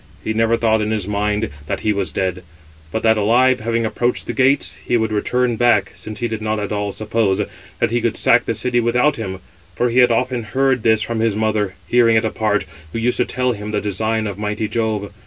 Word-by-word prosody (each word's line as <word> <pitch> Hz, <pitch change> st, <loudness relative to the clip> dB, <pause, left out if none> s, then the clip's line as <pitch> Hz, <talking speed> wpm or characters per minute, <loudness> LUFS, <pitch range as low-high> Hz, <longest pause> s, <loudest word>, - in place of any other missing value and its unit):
He 110 Hz, -, -1 dB
never 115 Hz, +1 st, +2 dB
thought 110 Hz, -1 st, +2 dB
in 105 Hz, -, -1 dB
his 105 Hz, -3 st, -1 dB
mind 105 Hz, 0 st, -1 dB, 0.2 s
that -, -, -3 dB
he 105 Hz, -, +1 dB
was 95 Hz, -5 st, -2 dB
dead; 95 Hz, 0 st, -2 dB, 0.5 s
but 110 Hz, -, -3 dB
that 110 Hz, -1 st, +4 dB
alive, 125 Hz, +5 st, +3 dB
having 115 Hz, +1 st, -1 dB
approached 120 Hz, +2 st, -1 dB
the -, -, -3 dB
gates, 135 Hz, +2 st, +2 dB
he 120 Hz, -, +1 dB
would 110 Hz, -1 st, -1 dB
return 120 Hz, +3 st, 0 dB
back, 120 Hz, 0 st, +3 dB
since 110 Hz, +1 st, -8 dB
he 120 Hz, -, +1 dB
did 110 Hz, -1 st, -4 dB
not 110 Hz, 0 st, -1 dB
at 105 Hz, -, -4 dB
all 105 Hz, -1 st, -2 dB
suppose 110 Hz, -2 st, 0 dB, 0.4 s
that -, -, 0 dB
he 120 Hz, 0 st, +1 dB
could 115 Hz, -1 st, -1 dB
sack 115 Hz, +1 st, +4 dB
the 115 Hz, -, -1 dB
city 120 Hz, +3 st, 0 dB
without 125 Hz, +5 st, +2 dB
him, 95 Hz, -4 st, -5 dB, 0.3 s
for 120 Hz, +3 st, +1 dB
he 125 Hz, -, +3 dB
had 125 Hz, -1 st, +6 dB
often 125 Hz, +1 st, 0 dB
heard 130 Hz, +2 st, +1 dB
this 110 Hz, -1 st, +3 dB
from 115 Hz, -1 st, -3 dB
his 110 Hz, -2 st, +1 dB
mother, 105 Hz, -2 st, 0 dB
hearing 115 Hz, -2 st, +4 dB
it 110 Hz, -, +1 dB
apart, 110 Hz, -2 st, 0 dB, 0.3 s
who -, -, -4 dB
used 120 Hz, +2 st, 0 dB
to 125 Hz, -, +2 dB
tell 125 Hz, 0 st, 0 dB
him 105 Hz, -2 st, -5 dB
the 105 Hz, -1 st, 0 dB
design 110 Hz, +2 st, -1 dB
of 100 Hz, -1 st, -5 dB
mighty 105 Hz, +1 st, -2 dB
Jove. 110 Hz, -3 st, -2 dB
110 Hz, 230 wpm, -19 LUFS, 105-120 Hz, 0.5 s, had